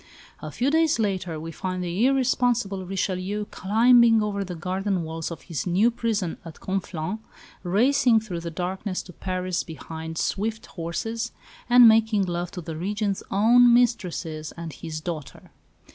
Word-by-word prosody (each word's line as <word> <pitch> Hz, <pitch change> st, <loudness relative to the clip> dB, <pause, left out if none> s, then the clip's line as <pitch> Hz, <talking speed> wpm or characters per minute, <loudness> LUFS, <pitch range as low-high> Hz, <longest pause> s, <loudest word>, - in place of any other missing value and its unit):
A -, -, -6 dB
few 260 Hz, +3 st, 0 dB
days 320 Hz, 0 st, +3 dB
later 185 Hz, -7 st, -2 dB
we 165 Hz, +1 st, -6 dB
find 185 Hz, +2 st, -4 dB
the 180 Hz, +8 st, +1 dB
irresponsible 245 Hz, -7 st, +1 dB
Richelieu 195 Hz, +2 st, -2 dB
climbing 225 Hz, +2 st, +5 dB
over 200 Hz, -1 st, -2 dB
the 180 Hz, -2 st, -6 dB
garden 185 Hz, +2 st, -2 dB
walls 160 Hz, 0 st, -4 dB
of 170 Hz, -, -8 dB
his 165 Hz, 0 st, -4 dB
new 200 Hz, +7 st, +3 dB
"prison" 220 Hz, -7 st, -2 dB
at 165 Hz, -2 st, -11 dB
Conflans, 190 Hz, 0 st, -3 dB, 0.4 s
racing 230 Hz, +5 st, +3 dB
through 200 Hz, -6 st, -5 dB
the 170 Hz, 0 st, -5 dB
darkness 185 Hz, +3 st, -3 dB
to 180 Hz, -, -13 dB
Paris 185 Hz, 0 st, -2 dB
behind 160 Hz, 0 st, -7 dB
swift 220 Hz, +5 st, -2 dB
horses, 195 Hz, +7 st, -4 dB, 0.4 s
and 245 Hz, -1 st, +9 dB
making 220 Hz, -2 st, +4 dB
love 175 Hz, -1 st, -3 dB
to 180 Hz, -, -5 dB
the 160 Hz, -1 st, -6 dB
Regent's 200 Hz, +3 st, -2 dB
own 235 Hz, +4 st, +6 dB
mistresses 180 Hz, -10 st, 0 dB
and 165 Hz, -2 st, -6 dB
his 155 Hz, -2 st, -6 dB
daughter! 155 Hz, -5 st, -7 dB
190 Hz, 150 wpm, -25 LUFS, 170-225 Hz, 0.4 s, and